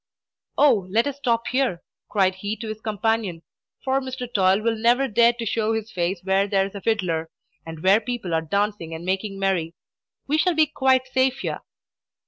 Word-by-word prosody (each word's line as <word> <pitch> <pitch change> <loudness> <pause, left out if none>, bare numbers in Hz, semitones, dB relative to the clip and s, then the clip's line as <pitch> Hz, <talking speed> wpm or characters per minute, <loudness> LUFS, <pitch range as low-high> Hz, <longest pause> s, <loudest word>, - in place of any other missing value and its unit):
"Oh, 235 -11 +4
let 225 +5 +2
us 285 -1 -3
stop 235 -4 0
here," 255 -10 0 0.3
cried 190 -3 +2
he 205 +3 -4
to 225 0 -7
his 215 0 -6
companion; 215 -5 -1 0.4
"for 265 +1 +1
Mr. 260 -1 -5
Toil 190 0 +3
will 230 +1 +1
never 240 +4 +2
dare 235 +1 +4
to 235 -1 -6
show 220 0 0
his 220 0 -4
face 175 0 -2
where 195 +1 +2
there 195 -1 +2
is 195 - -8
a 200 - -7
fiddler, 180 -8 -1 0.4
and 160 -1 -8
where 195 +4 +5
people 235 -9 -4
are 160 - +2
dancing 200 -1 -2
and 165 +2 -8
making 195 +2 -2
merry. 185 -4 -1 0.5
We 300 +3 +1
shall 360 0 +2
be 315 0 +5
quite 265 -3 +2
safe 260 +1 0
here!" - - -3
215 Hz, 190 wpm, -23 LUFS, 190-245 Hz, 0.5 s, where